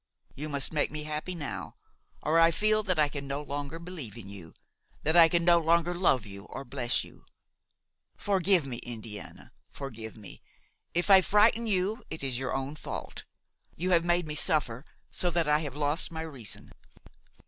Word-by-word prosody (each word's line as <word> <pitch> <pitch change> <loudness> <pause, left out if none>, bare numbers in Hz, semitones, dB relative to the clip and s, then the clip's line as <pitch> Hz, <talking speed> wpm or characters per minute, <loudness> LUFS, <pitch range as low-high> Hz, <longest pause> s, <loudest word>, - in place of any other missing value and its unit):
You 150 +3 -4
must 140 +1 0
make 150 - +1
me 155 0 -5
happy 155 +4 -4
now, 145 -6 -5 0.5
or 160 +2 +3
I 165 0 +7
feel 215 +6 +2
that 185 -5 -1
I 150 -1 +4
can 140 -1 -6
no 140 +1 -2
longer 145 +2 -5
believe 165 - -7
in 100 -4 -9
you–that 100 - -7
I 165 -1 +8
can 170 0 +1
no 170 -1 +6
longer 170 +1 +2
love 170 - +2
you 100 0 -10
or 140 - -8
bless 125 -1 -1
you. - - -15 0.9
Forgive 190 -4 +2
me, 125 -3 -5
Indiana, 110 -4 -8 0.2
forgive 115 -6 -8
me! 105 -3 -11 0.5
If 175 +4 +2
I 190 -1 +9
frighten 215 +5 +4
you 205 +3 0
it 160 -2 -6
is 130 -2 -2
your 130 -1 -2
own 135 +2 -3
fault; - - -7 0.5
you 180 +3 -1
have 170 -2 +5
made 175 0 +2
me 150 - -3
suffer 145 -4 +1 0.3
so 180 - +1
that 170 -2 0
I 150 0 +4
have 145 -4 -5
lost 150 +3 +1
my 160 -1 -4
reason!" 135 -10 -7
155 Hz, 180 wpm, -29 LUFS, 135-175 Hz, 0.9 s, I